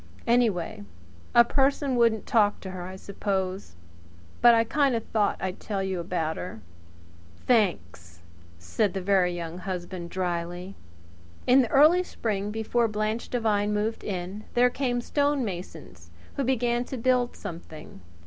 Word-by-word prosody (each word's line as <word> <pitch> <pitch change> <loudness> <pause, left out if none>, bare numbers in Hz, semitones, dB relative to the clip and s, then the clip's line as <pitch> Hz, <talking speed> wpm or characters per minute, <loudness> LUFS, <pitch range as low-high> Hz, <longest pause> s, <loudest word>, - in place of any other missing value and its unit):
Anyway 220 - +1 0.5
a 235 - +9
person 270 +1 +1
wouldn't 230 -3 +2
talk 210 -3 +2
to 190 - -7
her, 185 -1 -6
I 185 +1 -7
suppose. 190 - -3 0.7
But 240 -1 +8
I 225 - +4
kind 275 +2 +1
of 225 - -2
thought 210 -2 0
I'd 185 0 -4
tell 200 -3 -3
you 190 -2 -2
about 170 -2 -2
her." 180 -11 -6 0.9
"Thanks!" 90 - 0 0.3
said 180 - -1
the 190 - -2
Very 190 -2 +3
Young 170 0 -5
Husband 180 -2 -5
dryly. 175 +1 -3 0.7
In 255 +2 +6
the 240 - -1
early 310 +6 +6
spring, 210 - -3
before 225 +2 0
Blanche 215 +1 -2
Devine 210 -3 +1
moved 215 +2 -2
in, 190 +2 -5
there 245 +1 +4
came 245 -3 -1
stonemasons, 200 - -3 0.3
who 280 - -1
began 240 -1 +1
to 265 - -6
build 250 0 +1
something. 165 - -9
205 Hz, 140 wpm, -26 LUFS, 180-240 Hz, 0.9 s, a